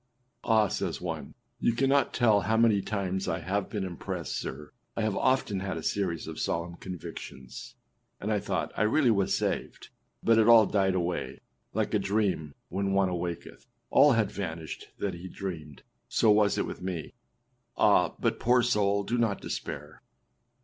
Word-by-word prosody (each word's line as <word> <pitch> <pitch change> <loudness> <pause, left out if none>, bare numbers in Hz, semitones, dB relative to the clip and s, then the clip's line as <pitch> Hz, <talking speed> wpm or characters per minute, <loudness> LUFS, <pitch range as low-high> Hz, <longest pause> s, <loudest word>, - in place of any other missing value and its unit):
â - - -6
âAh!â 105 - 0
says - - -2
one, - - -5 0.3
âyou 120 - +2
cannot 135 +1 +3
tell 110 -5 +4
how 110 +2 +1
many 110 -3 +4
times 95 -2 -2
I 80 - 0
have 95 +3 -2
been 105 -3 -3
impressed, 90 -3 -4
sir, 75 +3 -5 0.3
I 115 - 0
have 110 -2 0
often 130 -7 +1
had 95 -3 -3
a 80 - -6
series 90 -4 -1
of 80 -1 -7
solemn 85 +1 -2
convictions, 75 -7 -8 0.4
and 105 - -2
I 105 - +2
thought - - -3
1 105 +1 +2
really 130 -1 +4
was 100 -3 +2
saved, - - -3 0.3
but 115 -1 +5
it 110 - +4
all 115 -2 +8
died 95 -2 +1
away; 90 -1 -2 0.3
like - - 0
a - - +3
dream, 95 -8 -1
when 100 0 -1
one 95 -1 +3
awaketh, 85 -1 -5 0.2
all 145 0 +7
hath 110 -3 +1
vanished 80 -6 -5
that 100 -2 -2
he 85 +2 -8
dreamed, 80 -7 -7 0.3
so 110 - +4
was 105 -1 +4
it - - +1
with - - -7
me.â 90 -4 -4 0.6
Ah! - - +4
but - - 0
poor 125 +1 +4
soul, 100 -4 +2
do 120 +4 -1
not 110 -4 +1
despair. - - -6
100 Hz, 175 wpm, -29 LUFS, 90-110 Hz, 0.6 s, all